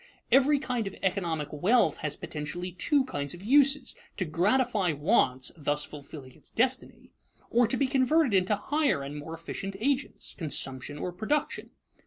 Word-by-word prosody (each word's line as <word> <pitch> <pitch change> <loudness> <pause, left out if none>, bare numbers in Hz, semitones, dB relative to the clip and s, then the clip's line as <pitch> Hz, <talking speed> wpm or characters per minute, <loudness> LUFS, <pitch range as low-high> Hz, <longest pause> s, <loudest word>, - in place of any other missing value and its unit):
Every 275 +2 +5
kind 245 -5 -2
of 195 - -6
economic 170 -6 -1
wealth 180 +2 +3
has 150 -1 -3
potentially 165 +4 -5
two 260 - +1
kinds 145 - -4
of 175 - -11
uses: 275 +2 +4 0.2
to 185 - -1
gratify 200 +2 +1
wants 145 - +1
thus 150 -1 -1
fulfilling 140 -2 -10
its - - -15
destiny 255 +2 -1 0.4
or 240 0 +4
to 255 - 0
be 275 - +2
converted 265 0 +2
into 190 +2 +3
higher 285 - 0
and 140 +2 -6
more 150 +2 -6
efficient 195 +4 -6
agents 275 +4 -1
consumption 145 -3 -2
or 180 - -3
production. 220 +11 -2
190 Hz, 155 wpm, -28 LUFS, -, 0.4 s, Every